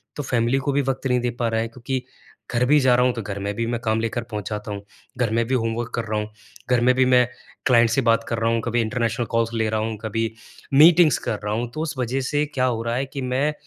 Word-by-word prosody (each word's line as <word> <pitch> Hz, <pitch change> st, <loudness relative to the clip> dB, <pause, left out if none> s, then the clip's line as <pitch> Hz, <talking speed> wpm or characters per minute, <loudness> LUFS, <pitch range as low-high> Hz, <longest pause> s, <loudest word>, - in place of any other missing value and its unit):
तो 145 Hz, -, -4 dB
फैमिली 120 Hz, 0 st, +1 dB
को 140 Hz, +1 st, -1 dB
भी 140 Hz, +1 st, +2 dB
वक़्त 135 Hz, 0 st, -3 dB
नहीं 125 Hz, -1 st, +2 dB
दे 125 Hz, -, 0 dB
पा 120 Hz, -, +1 dB
रहा 110 Hz, 0 st, 0 dB
हैं 115 Hz, -, -3 dB
क्योंकि 125 Hz, +2 st, -4 dB, 0.5 s
घर 125 Hz, +1 st, +2 dB
भी 150 Hz, +3 st, +5 dB
जा 130 Hz, -3 st, +4 dB
रहा 125 Hz, 0 st, +3 dB
हूँ 125 Hz, -, +2 dB
तो 115 Hz, -, -4 dB
घर 100 Hz, -1 st, -5 dB
में 100 Hz, +1 st, -3 dB
भी 115 Hz, -, -1 dB
मैं 120 Hz, -1 st, -2 dB
काम 110 Hz, -1 st, 0 dB
लेकर 115 Hz, +1 st, -2 dB
पहुँच 105 Hz, -1 st, -4 dB
जाता 105 Hz, 0 st, -5 dB
हूँ। 100 Hz, -1 st, -5 dB, 0.4 s
घर 125 Hz, -3 st, +1 dB
में 115 Hz, 0 st, +2 dB
भी 130 Hz, -, -1 dB
होमवर्क 115 Hz, 0 st, -2 dB
कर 120 Hz, -, -1 dB
रहा 110 Hz, 0 st, -1 dB
हूँ, 105 Hz, 0 st, -4 dB, 0.4 s
घर 125 Hz, -1 st, +3 dB
में 125 Hz, +1 st, +4 dB
भी 130 Hz, 0 st, +4 dB
मैं 125 Hz, -1 st, +4 dB, 0.4 s
क्लाइंट 120 Hz, -2 st, +5 dB
से 125 Hz, +4 st, +2 dB
बात 115 Hz, 0 st, +3 dB
कर 115 Hz, -, -1 dB
रहा 115 Hz, 0 st, +1 dB
हूँ 115 Hz, -1 st, +1 dB
कभी 120 Hz, 0 st, +1 dB
इंटरनेशनल 115 Hz, +1 st, -1 dB
कॉल्स 115 Hz, 0 st, 0 dB
ले 110 Hz, -1 st, 0 dB
रहा 110 Hz, 0 st, 0 dB
हूँ, 110 Hz, 0 st, -3 dB
कभी 115 Hz, +1 st, -2 dB, 0.4 s
मीटिंग्स 155 Hz, 0 st, +7 dB
कर 105 Hz, -, -1 dB
रहा 105 Hz, 0 st, -2 dB
हूँ 120 Hz, +2 st, -2 dB
तो 155 Hz, -, -4 dB
उस 160 Hz, -3 st, -4 dB
वजह 130 Hz, +2 st, -1 dB
से 145 Hz, +3 st, 0 dB
क्या 130 Hz, -1 st, +1 dB
हो 115 Hz, -2 st, -1 dB
रहा 115 Hz, 0 st, -1 dB
है 135 Hz, +2 st, -1 dB
कि 135 Hz, 0 st, -7 dB
मैं 130 Hz, +4 st, 0 dB
120 Hz, 280 wpm, -23 LUFS, 115-130 Hz, 0.5 s, मीटिंग्स